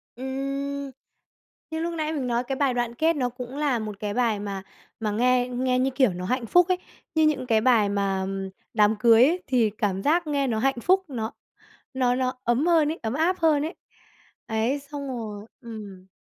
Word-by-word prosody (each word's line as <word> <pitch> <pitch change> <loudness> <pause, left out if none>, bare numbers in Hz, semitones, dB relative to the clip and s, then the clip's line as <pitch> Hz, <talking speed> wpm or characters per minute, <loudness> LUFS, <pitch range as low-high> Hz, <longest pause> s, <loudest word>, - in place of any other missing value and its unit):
Ừm. 275 +2 -4 0.8
Như 320 - -2
lúc 340 +1 -2
nãy 310 -1 -2
mình 275 -5 -2
nói 240 0 0
cái 265 +2 -3
bài 275 -3 +2
đoạn 240 -1 -2
kết 325 +5 +2
nó 255 -4 0
cũng 250 +2 -8
là 285 -5 +1
một 210 -2 -6
cái 205 -1 -3
bài 230 -4 +1
mà 200 -2 -5 0.4
mà 215 -2 -1
nghe 250 +3 +2
nghe 255 +1 +1
như 265 +1 +2
kiểu 255 -9 +3
nó 180 +1 -5
hạnh 250 +4 -1
phúc 355 - +5
ấy. 365 - +2 0.4
Như 315 - +4
những 275 -4 0
cái 220 -2 +3
bài 225 -4 +4
mà 195 -1 0 0.5
đám 215 0 +4
cưới 240 +10 +5
thì 240 -4 +3
cảm 200 -2 -2
giác 330 +2 +2
nghe 285 -2 0
nó 225 -3 0
hạnh 270 +1 +1
phúc, 380 +5 +3
nó 225 -4 -3 0.6
nó 250 -2 +2
nó 255 0 0
ấm 240 +6 +2
hơn 330 -4 +4
ấy, - - -8
ấm 225 +1 -2
áp 340 +5 +1
hơn 310 -3 +3
ấy. 325 +4 -4 0.7
Đấy, 225 +5 0
xong 285 0 -7
rồi 215 -5 -6
ừm. 210 -6 -9
250 Hz, 200 wpm, -25 LUFS, 220-285 Hz, 0.8 s, phúc